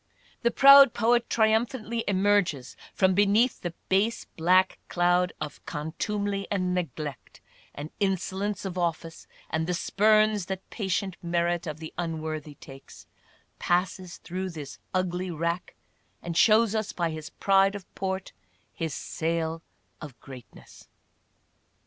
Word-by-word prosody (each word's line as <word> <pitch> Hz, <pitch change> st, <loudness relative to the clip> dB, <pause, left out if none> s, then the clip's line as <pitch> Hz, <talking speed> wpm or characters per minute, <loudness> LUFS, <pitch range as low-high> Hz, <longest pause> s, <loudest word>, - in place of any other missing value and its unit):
The 235 Hz, -, +3 dB
proud 275 Hz, 0 st, +8 dB
poet 235 Hz, +1 st, +2 dB
triumphantly 225 Hz, +1 st, +1 dB
emerges 190 Hz, -9 st, +1 dB, 0.2 s
from 190 Hz, -1 st, +2 dB
beneath 205 Hz, +5 st, +3 dB
the 175 Hz, -1 st, -5 dB
base 210 Hz, +5 st, +1 dB
black 180 Hz, +3 st, +2 dB
cloud 175 Hz, +1 st, +2 dB
of 150 Hz, -2 st, -7 dB
contumely 195 Hz, +6 st, -3 dB
and 185 Hz, -3 st, 0 dB
neglect 155 Hz, -6 st, -5 dB, 0.2 s
— -, -, -29 dB
the 145 Hz, +2 st, -6 dB
insolence 195 Hz, +1 st, -1 dB
of 185 Hz, -1 st, -4 dB
office 165 Hz, -1 st, -3 dB, 0.2 s
and 160 Hz, +1 st, -1 dB
the 180 Hz, -, 0 dB
spurns 215 Hz, +1 st, +2 dB
that 190 Hz, 0 st, -5 dB
patient 190 Hz, -3 st, -2 dB
merit 170 Hz, 0 st, -1 dB
of 155 Hz, -1 st, -4 dB
the 160 Hz, 0 st, -9 dB
unworthy 155 Hz, -3 st, -4 dB
takes 135 Hz, 0 st, -14 dB, 0.3 s
— -, -, -36 dB
passes 180 Hz, 0 st, -1 dB
through 185 Hz, +2 st, -5 dB
this 150 Hz, -5 st, -8 dB
ugly 185 Hz, 0 st, -1 dB
rack 170 Hz, +2 st, -3 dB, 0.5 s
and 170 Hz, -1 st, -4 dB
shows 215 Hz, +3 st, +5 dB
us 215 Hz, -2 st, -2 dB
by 170 Hz, -2 st, -1 dB
his 155 Hz, -1 st, -7 dB
pride 195 Hz, 0 st, +2 dB
of 200 Hz, -3 st, -8 dB
port 190 Hz, 0 st, -4 dB, 0.4 s
his 160 Hz, -4 st, -4 dB
sail 165 Hz, 0 st, -2 dB, 0.4 s
of 135 Hz, -7 st, -10 dB
greatness. 130 Hz, -1 st, -14 dB
180 Hz, 130 wpm, -27 LUFS, 165-205 Hz, 0.5 s, proud